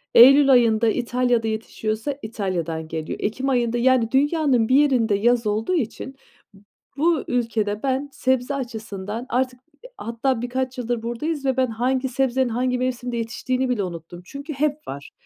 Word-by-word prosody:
Eylül 275 +3 +8
ayında 230 -3 +4
İtalya'da 245 -1 0
yetişiyorsa 220 +4 -3
İtalya'dan 175 -7 -3
geliyor. 160 0 -5
Ekim 255 +6 -1
ayında, 240 -2 +1
yani, 240 -2 +3
dünyanın 275 -4 +2
bir 255 - +4
yerinde 255 -7 +3
yaz 235 +2 +2
olduğu 215 - 0
için 265 -1 -3 0.4
b 195 - -18 0.4
bu 320 +1 +2
ülkede 220 -4 -1
ben 270 +1 -1
sebze 260 +1 0
açısından 220 -3 -5
artık 255 0 -1 0.2
h - - -9
hatta 230 +1 -1
birkaç 255 +1 -3
yıldır 240 -2 -2
buradayız 280 +5 -3
ve 265 -1 +1
ben 260 -1 +3
hangi 255 +3 -1
sebzenin 260 0 +1
hangi 250 +2 0
mevsimde 250 -1 -2
yetiştiğini 255 +3 -2
bile 225 -5 0
unuttum. 175 -1 -7
Çünkü 280 - -7
hep 295 +2 -1
var. 140 +1 -7
245 Hz, 155 wpm, -23 LUFS, 225-265 Hz, 0.4 s, Eylül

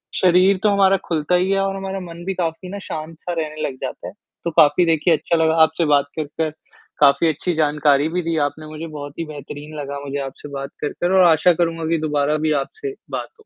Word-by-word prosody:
शरीर 185 +2 +4
तो 210 - +5
हमारा 195 -1 +4
खुलता 160 +2 +1
ही 185 +2 +2
है 195 - +2
और 195 0 -1
हमारा 195 0 -4
मन 175 -1 -9
भी 195 - -1
काफ़ी 175 0 -3
ना 200 +1 -6
शांत-सा 160 +2 -6
रहने 155 -1 -4
लग 130 - -6
जाता - - -5
है। - - -8 0.3
तो 170 - -2
काफ़ी 155 +4 +5
देखिए 165 +1 +3
अच्छा 170 - -1
लगा 160 0 +3
आपसे 160 +1 +1
बात 145 -1 +3
कर, 155 - -1
कर, 155 +1 -3 0.5
काफ़ी 145 +3 +5
अच्छी 165 +4 -1
जानकारी 150 -1 +2
भी 180 +2 -1
दी 165 0 -1
आपने 155 +2 -9
मुझे, 155 +2 -7
बहुत 145 -2 -8
ही 165 - -2
बेहतरीन 150 +1 -9
लगा 140 0 -5
मुझे 140 +1 -4
आपसे 135 +2 -9
बात 140 0 -5
कर, 145 - -1
कर 175 +1 +1
और - - +7
आशा 165 +3 +4
करूँगा 165 -1 -1
की 165 - +2
दोबारा 150 +1 +1
भी - - +2
आपसे 415 - -7
बात - - -3
हो। - - -24
160 Hz, 230 wpm, -21 LUFS, 150-180 Hz, 0.5 s, और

